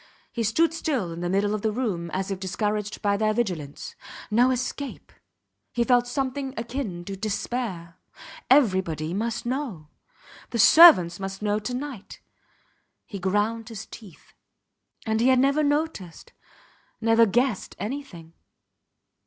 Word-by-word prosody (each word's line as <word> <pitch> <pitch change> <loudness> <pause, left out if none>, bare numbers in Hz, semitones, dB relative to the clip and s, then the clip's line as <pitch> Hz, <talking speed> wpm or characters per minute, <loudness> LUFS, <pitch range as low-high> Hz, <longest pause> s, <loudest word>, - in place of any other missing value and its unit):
He 235 - -3
stood 310 +10 +2
still 270 - -2
in 165 - -7
the 175 - -2
middle 200 +2 +1
of 215 - -2
the 220 - 0
room 205 -8 -2
as 190 +3 -3
if 195 - -3
discouraged 210 +2 -3
by 200 -1 +2
their 215 0 +1
vigilance. 175 -11 -3 0.4
No 240 +4 +4
escape! 260 +2 -4 0.6
He 240 - +1
felt 245 0 +3
something 270 +1 -3
akin 225 -7 -4
to 195 - -5
despair. 200 -4 -4 0.5
Everybody 185 - +2
must 230 +4 -2
know. 240 - -4 0.6
The 235 - -3
servants 220 - +8
must 195 +1 -6
know 210 0 +1
to 245 +4 -4
night. 255 -6 -7 0.9
He 200 - -7
ground 210 +5 -1
his 220 -2 -7
teeth... 200 -8 -14 0.7
And 220 0 0
he 245 - +3
had 260 -1 +5
never 275 +4 +3
noticed, 290 - -2 0.7
never 225 0 +4
guessed 240 0 0
anything. 205 - -7
220 Hz, 135 wpm, -25 LUFS, 190-250 Hz, 0.9 s, servants